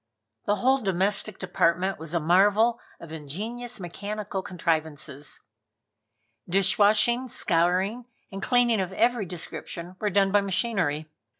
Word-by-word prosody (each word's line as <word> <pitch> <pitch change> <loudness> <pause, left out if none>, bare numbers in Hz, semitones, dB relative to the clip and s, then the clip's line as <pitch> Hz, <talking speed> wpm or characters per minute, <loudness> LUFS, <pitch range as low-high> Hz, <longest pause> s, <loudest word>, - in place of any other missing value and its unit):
The 205 - +2
whole 260 +5 +2
domestic 195 0 0
department 180 0 0
was 160 +1 -4
a - - +3
marvel 205 +8 +3 0.2
of 165 - -11
ingenious 215 - -4
mechanical 200 +2 -5
contrivances. 160 -6 -3 1.1
Dishwashing, 210 +6 +3
scouring 185 +5 0 0.2
and 195 0 -6
cleaning 240 -4 +3
of 190 0 -4
every 230 -1 +1
description 175 +1 -7
were 210 - 0
done 195 0 +2
by 205 0 +4
machinery. 180 -6 0
195 Hz, 115 wpm, -26 LUFS, 170-215 Hz, 1.1 s, by